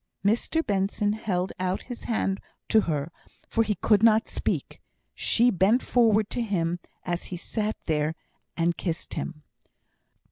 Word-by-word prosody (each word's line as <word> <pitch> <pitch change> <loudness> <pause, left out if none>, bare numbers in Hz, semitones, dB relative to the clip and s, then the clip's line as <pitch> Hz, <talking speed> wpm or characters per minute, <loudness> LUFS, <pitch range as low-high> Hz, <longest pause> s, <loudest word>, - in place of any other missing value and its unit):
Mr 240 +10 +1
Benson 200 +1 +1
held 190 -4 -1
out 185 +1 -1
his 245 -2 -8
hand 195 -4 0 0.3
to 220 - +6
her, 155 -3 -2 0.4
for 225 - +2
he 210 -1 0
could 210 -1 +3
not 225 0 +5
speak. - - -3 0.3
She 240 +2 +3
bent 200 +6 +3
forward 220 -3 +3
to 245 - -1
him 175 -6 0 0.2
as 175 -1 -2
he 180 - -5
sat 215 +4 -2
there, 155 0 0 0.4
and 170 0 +2
kissed 170 -3 -4
him. 155 -3 -5
200 Hz, 145 wpm, -27 LUFS, 175-220 Hz, 0.4 s, to